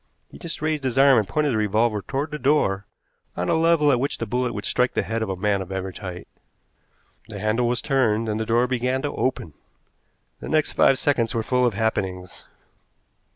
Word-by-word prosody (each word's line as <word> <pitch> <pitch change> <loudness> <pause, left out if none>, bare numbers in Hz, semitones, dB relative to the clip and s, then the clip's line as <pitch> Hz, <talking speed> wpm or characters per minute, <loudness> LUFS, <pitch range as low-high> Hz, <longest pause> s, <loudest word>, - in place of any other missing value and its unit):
He - - -13
just 165 -3 -6
raised 155 -2 -1
his 130 -1 -2
arm 135 -3 +6
and 105 - -2
pointed 150 +5 0
the - - 0
revolver 105 +1 +1
toward 140 +8 -3
the 150 - -5
door, 120 -8 +1 0.5
on 90 0 -1
a - - +3
level 160 -2 +3
at 125 - +2
which 140 +3 -2
the 115 - -3
bullet 125 +3 -1
would 105 - -6
strike 125 0 0
the - - +1
head 115 0 -3
of 110 - -2
a 95 - -2
man 100 +1 0
of 95 0 -8
average 95 0 -5
height. 90 -3 -7 1.0
The 105 - -7
handle 110 +4 +1
was 120 0 -1
turned, 115 -5 +1
and 105 0 -2
the 110 - -2
door 120 +2 +3
began 125 +1 -1
to 145 - -2
open. 105 - -2 0.9
The - - -7
next 155 -1 +1
five 135 - +4
seconds 120 -5 0
were 115 - 0
full 125 +2 +2
of 115 - -2
happenings. 95 -4 -3
115 Hz, 210 wpm, -23 LUFS, 105-135 Hz, 1.0 s, arm